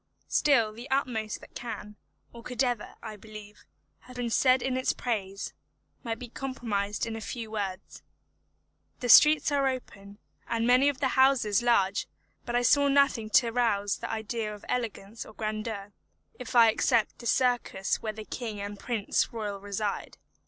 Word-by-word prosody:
Still 235 -8 +3
the 235 +4 -10
utmost 240 -6 -1
that - - -15
can, 210 -3 -7 0.4
or 235 - -10
could 250 +2 -1
ever, 245 -4 -2
I 220 -2 -6
believe, 215 0 -12 0.3
have 250 - -15
been 245 -2 -3
said 255 +1 +4
in 260 -1 -1
its 260 - +1
praise, 200 -5 -3 0.5
might 230 -3 -3
be 245 - -8
comprised 225 -6 -3
in 225 -1 -5
a 225 - -6
few 225 0 -6
words. 195 -3 -5 1.0
The 245 - -3
streets 300 +5 +7
are 280 -1 +2
open, 205 -6 -6 0.3
and 230 0 0
many 255 +3 +5
of 275 -3 -5
the 265 - +2
houses 255 -6 +3
large; 215 -6 +2 0.4
but 240 - -2
I 245 - +2
saw 285 +3 +4
nothing 275 -6 +3
to 235 +1 +4
rouse 210 -4 +1
the - - -6
idea 220 0 -3
of 210 -1 -10
elegance 225 -3 -3
or - - -13
grandeur, 215 -2 -4 0.5
if 250 0 -7
I 230 -2 +7
except 230 0 +1
the 235 - -6
circus 245 -7 +1
where 220 - -2
the 215 0 -9
king 220 -4 -5
and 200 0 -6
prince 225 -3 -1
royal 210 -3 -4
reside. 200 +1 -4
230 Hz, 165 wpm, -28 LUFS, 210-250 Hz, 1.0 s, streets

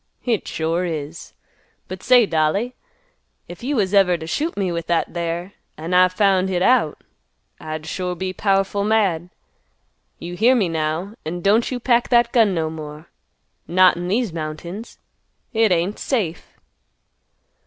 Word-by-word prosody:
"Hit 235 -5 -1
sure 165 +2 -1
is. 160 -2 -5 0.5
But 185 0 -7
say, 245 -2 +5
dolly, 180 +8 0 0.7
if 175 0 -10
you 275 +4 -2
was 200 -4 0
ever 185 -3 +4
t' 160 - -8
shoot 300 - -2
me 190 -3 0
with 170 -1 -4
that 170 -1 0
there, 170 +2 -3 0.2
an' 165 +4 -5
I 185 0 +6
found 190 0 +2
hit 180 -1 0
out, 240 -11 +2 0.6
I'd 155 0 -6
sure 180 +2 -3
be 185 +1 -4
powerful 195 +1 +1
mad. 195 -6 +1 0.9
You 175 +1 -7
hear 235 +7 +4
me, 200 -8 +1
now, 160 +5 -2
an' 175 +3 -4
don't 210 +5 +3
you 255 - -3
pack 240 -1 +2
that 240 -1 +4
gun 220 -6 +3
no 160 -1 0
more; 155 0 -9 0.6
not 185 +1 +5
in 175 +1 -4
these 215 -1 0
mountains. 170 +7 -6 0.6
Hit 220 -2 +3
ain't 180 +4 0
safe." 195 - -2
185 Hz, 155 wpm, -21 LUFS, 165-215 Hz, 0.9 s, I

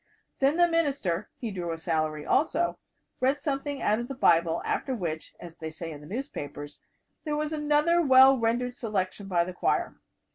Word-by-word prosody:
Then 280 +4 +3
the 350 0 +5
minister 280 - 0
he 230 -3 -4
drew 175 -3 -4
a 165 - -3
salary, 155 -2 -1
also 330 +4 +1 0.4
read 265 +3 +2
something 285 0 -3
out 215 +2 +2
of 240 - -4
the 270 - -6
Bible, 170 -7 +3
after 265 - -1
which 165 -7 -5
as 170 -1 -11
they 160 - -5
say 165 +1 -7
in 150 -1 -9
the 150 - -12
newspapers 145 - -6 0.4
"there 300 -2 -2
was 305 +1 -2
another 300 +3 +2
well 265 -2 +7
rendered 245 +1 0
selection 200 -3 -3
by 175 -3 +2
the 180 +1 -6
choir." - - 0
230 Hz, 180 wpm, -27 LUFS, -, 0.4 s, well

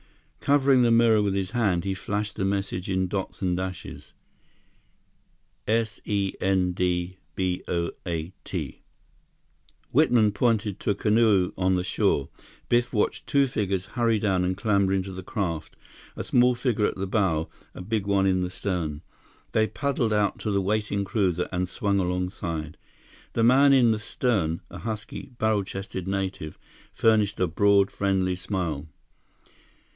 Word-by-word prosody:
Covering 140 -2 +4
the 120 - +4
mirror 115 -2 +5
with 100 -1 0
his 95 -1 -2
hand, 105 -8 +1
he 95 0 -1
flashed 105 +2 -3
the - - -2
message 95 -2 -2
in 95 -1 +1
dots 95 +1 -4
and 90 -1 +1
dashes: 95 -1 -6 1.5
S 110 -1 0
E 100 -2 0
N 95 -1 +2
D 90 0 -1 0.2
B 90 -1 -1
O 85 -1 -1 0.2
A 85 +1 -3
T. - - -5 1.1
Whitman 120 -7 +4
pointed 105 -2 0
to - - -3
a 100 - +2
canoe 105 -3 +3
on 95 0 +1
the 90 - 0
shore. 70 -6 0 0.4
Biff 120 +1 +2
watched 105 -3 -1
two 140 -1 +3
figures 100 -7 -2
hurry 115 -3 +2
down 95 -3 +1
and 90 +1 -1
clamber 100 -3 +2
into 95 0 -1
the 95 - -6
craft, 85 -5 -4 0.4
a - - -4
small 125 0 +3
figure 120 -4 +1
at - - -3
the 95 - -3
bow, 95 -6 +1 0.3
a - - -7
big 105 0 -2
one 100 -1 +2
in 95 -1 +2
the 90 - -1
stern. 85 -5 -3 0.5
They 110 0 +2
paddled 135 -5 -1
out 105 -2 +1
to - - -3
the 100 -1 +1
waiting 105 0 0
cruiser 95 -4 0
and 90 -1 -1
swung 100 0 0
alongside. 90 -4 -3 0.6
The 115 - +1
man 135 +4 +6
in 125 -4 +5
the 110 - 0
stern, 105 -8 0
a - - -8
husky, 110 +4 -6
barrel 110 -3 +1
chested 95 -1 -6
native, 95 -5 -3 0.3
furnished 110 -2 +2
a 90 - +3
broad, 100 +3 +3
friendly 95 -2 0
smile. 85 -6 -3
100 Hz, 155 wpm, -26 LUFS, 90-110 Hz, 1.5 s, man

